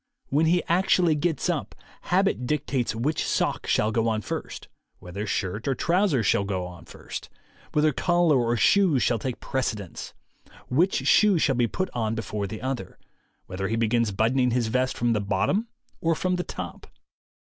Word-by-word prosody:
.When 155 +4 +2
he 175 +2 +3
actually 175 -1 +3
gets 160 +2 -1
up, 150 - -2 0.3
habit 185 -8 +1
dictates 135 -5 -1
which 140 +8 -1
sock - - -1
shall 110 - +2
go 115 +1 +1
on 110 -1 0
first, - - -6 0.3
whether 100 +4 -6
shirt 100 +4 -2
or 135 - +1
trousers 170 - +1
shall 100 - +3
go 95 -2 -2
on 90 -1 -11
first, - - -8 0.4
whether 150 0 +3
collar 175 -2 +3
or 120 0 +1
shoes 170 - +4
shall 115 - +1
take 125 +2 -4
precedence, 110 -8 -4 0.5
which 170 +9 +1
shoe 210 -4 +5
shall 145 -3 +2
be 120 -2 +2
put 185 +9 -3
on 110 -2 -1
before 105 -2 -3
the 110 +4 -7
other, 130 -8 -4 0.5
whether 95 +1 -4
he 110 - -1
begins 115 0 +1
buttoning 125 +6 +2
his 120 -2 0
vest 130 +2 0
from 120 -1 +1
the 105 - 0
bottom 190 - 0 0.3
or 165 0 +2
from 185 +3 0
the 180 - -2
top. - - -7
125 Hz, 170 wpm, -25 LUFS, 110-165 Hz, 0.5 s, shoe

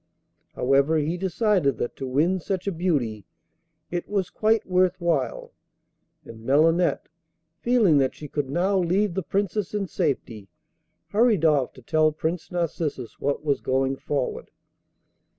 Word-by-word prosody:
However, 140 +5 +3
he 155 +3 0
decided 185 - +1
that 120 - -3
to 135 - -4
win 160 +9 +1
such 185 +1 -3
a 200 - 0
beauty 145 - -1 0.6
it 175 0 -3
was 200 -3 -1
quite 220 0 +1
worth 185 0 +2
while; 165 -6 -1 0.7
and 110 -1 -11
Melinette, 165 +7 +2 0.5
feeling 220 - +4
that 130 -1 +1
she 150 - -8
could 145 -1 -3
now 185 +6 +1
leave 185 +2 +1
the 190 - -1
Princess 200 +2 -2
in 205 -1 0
safety, 125 - -3 0.6
hurried 215 -5 +3
off 145 -5 +2
to 130 - -15
tell 155 +3 +2
Prince 160 +2 -3
Narcissus 160 -8 -3
what 145 +2 -2
was 140 -2 +1
going 135 +1 0
forward. 135 -1 -3
165 Hz, 140 wpm, -25 LUFS, 140-185 Hz, 0.7 s, feeling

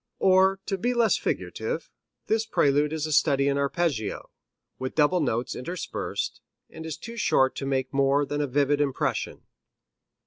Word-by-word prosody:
Or, 190 0 +4
to 195 -2 -2
be 245 +5 0
less 235 -2 +4
figurative, - - -3 0.3
this 220 0 0
prelude 145 -2 +2
is 155 -1 -2
a 155 - -4
study 140 -2 +3
in 140 0 +1
arpeggio, 140 -6 -1 0.5
with 130 0 -4
double 155 +4 +3
notes 125 -5 -1
interspersed, 175 +8 -4 0.3
and 160 - -8
is 155 -2 -5
too 235 +5 -9
short 130 - +2
to 135 - -3
make 130 -1 -1
more 140 +1 +3
than 145 +1 -2
a 145 - 0
vivid 145 +2 +2
impression. 140 -3 -2
145 Hz, 160 wpm, -26 LUFS, 135-180 Hz, 0.5 s, Or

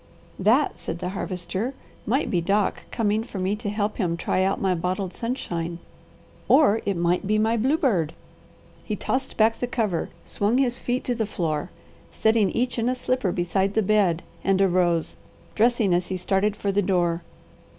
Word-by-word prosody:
"That," 230 +9 +3
said 165 - -4
the 180 - -4
Harvester, 190 +5 -3 0.3
"might 260 +7 +1
be 175 - +2
Doc 200 +4 0
coming 215 0 0
for 215 - -8
me 190 +2 0
to 215 -1 -4
help 210 0 -1
him 170 -5 0
try 185 - 0
out 190 +1 +1
my 190 -1 +1
bottled 180 +2 -2
sunshine, 175 -9 -3 0.7
or 225 -8 +5
it 200 -3 0
might 175 +2 +1
be 215 +1 +2
my 220 +2 +2
bluebird." 230 - +1 0.7
He 215 - -3
tossed 265 +6 -2
back 225 +1 +3
the 245 - -1
cover, 215 -8 -1 0.2
swung 210 +4 0
his 250 -2 +1
feet 250 +1 -1
to 245 - 0
the 225 -3 -1
floor, 160 -7 -2 0.4
setting 220 -3 +2
each 245 0 -1
in 230 +2 +1
a 255 - 0
slipper 250 -6 0
beside 190 +3 0
the 220 - +3
bed, 190 -5 +2 0.2
and 195 -1 +2
arose, 175 -3 +2 0.4
dressing 225 -4 +3
as 175 0 +1
he 190 - -2
started 195 +3 +1
for 200 -1 -1
the 200 +1 +2
door. 175 -3 +1
200 Hz, 175 wpm, -24 LUFS, 180-225 Hz, 0.7 s, or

